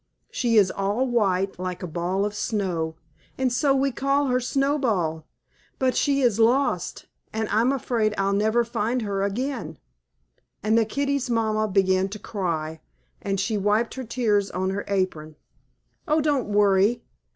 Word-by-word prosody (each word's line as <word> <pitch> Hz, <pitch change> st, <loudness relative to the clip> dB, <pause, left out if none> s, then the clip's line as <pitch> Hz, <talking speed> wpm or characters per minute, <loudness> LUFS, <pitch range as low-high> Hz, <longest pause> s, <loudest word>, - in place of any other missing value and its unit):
She 235 Hz, -3 st, +1 dB
is 195 Hz, -3 st, +5 dB
all 200 Hz, +6 st, 0 dB
white, 195 Hz, -6 st, 0 dB
like 185 Hz, -1 st, -4 dB
a -, -, -3 dB
ball 175 Hz, +4 st, -1 dB
of 205 Hz, -, -3 dB
snow, 180 Hz, -8 st, -2 dB, 0.4 s
and 260 Hz, -2 st, 0 dB
so 275 Hz, +2 st, +2 dB
we 275 Hz, 0 st, +1 dB
call 275 Hz, +2 st, +1 dB
her 250 Hz, 0 st, +2 dB
Snowball. 240 Hz, -, 0 dB, 0.5 s
But 260 Hz, -1 st, +1 dB
she 280 Hz, -1 st, +2 dB
is 235 Hz, -4 st, +2 dB
lost, 250 Hz, +5 st, +1 dB, 0.3 s
and 220 Hz, 0 st, -2 dB
I'm 230 Hz, +5 st, +3 dB
afraid 230 Hz, -5 st, 0 dB
I'll 195 Hz, 0 st, +1 dB
never 220 Hz, +4 st, +2 dB
find 235 Hz, +1 st, -1 dB
her 200 Hz, -2 st, -2 dB
again," 200 Hz, -, -3 dB, 0.9 s
and 215 Hz, +1 st, +2 dB
the 230 Hz, -1 st, +4 dB
kittie's 280 Hz, +2 st, -1 dB
mamma 215 Hz, -2 st, +1 dB
began 190 Hz, -1 st, +2 dB
to 210 Hz, -, -6 dB
cry, 165 Hz, -7 st, -3 dB, 0.4 s
and 195 Hz, -3 st, -2 dB
she 210 Hz, +2 st, 0 dB
wiped 210 Hz, +3 st, +1 dB
her 260 Hz, -, -5 dB
tears 220 Hz, -4 st, 0 dB
on 190 Hz, +1 st, -2 dB
her 200 Hz, +1 st, -3 dB
apron. 185 Hz, -6 st, -2 dB, 0.7 s
"Oh, 305 Hz, 0 st, +3 dB
don't 290 Hz, -5 st, +1 dB
worry. 205 Hz, +2 st, +3 dB
215 Hz, 155 wpm, -24 LUFS, 195-250 Hz, 0.9 s, is